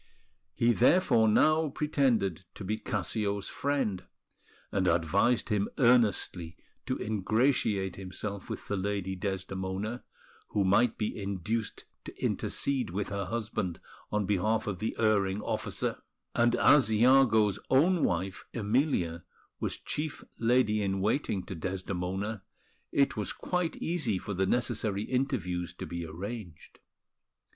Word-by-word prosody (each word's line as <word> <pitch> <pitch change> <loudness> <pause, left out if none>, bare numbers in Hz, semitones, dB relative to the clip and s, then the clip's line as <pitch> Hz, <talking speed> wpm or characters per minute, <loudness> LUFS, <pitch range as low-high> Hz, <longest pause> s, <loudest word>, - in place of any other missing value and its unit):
He 120 0 +3
therefore 120 -3 +4
now 155 +8 +4
pretended 130 - +1
to - - -7
be 105 +3 -2
Cassio's 100 -3 -2
friend, 135 -10 -1 0.7
and 95 -2 +1
advised 100 +10 +2
him 105 -2 +1
earnestly 110 - +2 0.3
to - - -1
ingratiate 105 -1 +1
himself 95 +1 -6
with - - -6
the 100 - -1
Lady 95 -1 -2
Desdemona, 95 +4 -3 0.4
who 100 - 0
might 110 +5 +3
be 105 - -2
induced 100 +3 -3 0.2
to - - -8
intercede 135 -6 -1
with 95 +3 -3
her 100 -1 -2
husband 110 -5 -3 0.3
on 105 -1 +1
behalf 105 +3 +1
of 100 -4 -3
the 110 - -2
erring 100 -3 +2
officer; - - -2 0.3
and 120 0 +3
as 130 -5 +5
Iago's 110 -3 +5
own 165 +6 +4
wife, 90 +2 -1
Emilia, 105 - 0 0.4
was - - -2
chief 150 0 -4 0.2
lady 115 -2 +3
in 95 -1 0
waiting 105 -1 0
to - - -7
Desdemona, 95 +3 -3 0.5
it 140 -4 +2
was 105 -2 -2
quite 180 -2 -2
easy 155 - -1
for 100 - -5
the 95 0 0
necessary 110 -3 0
interviews 110 -10 -2
to - - -6
be 85 -1 -5
arranged. 90 +1 -8
105 Hz, 125 wpm, -30 LUFS, 95-120 Hz, 0.7 s, as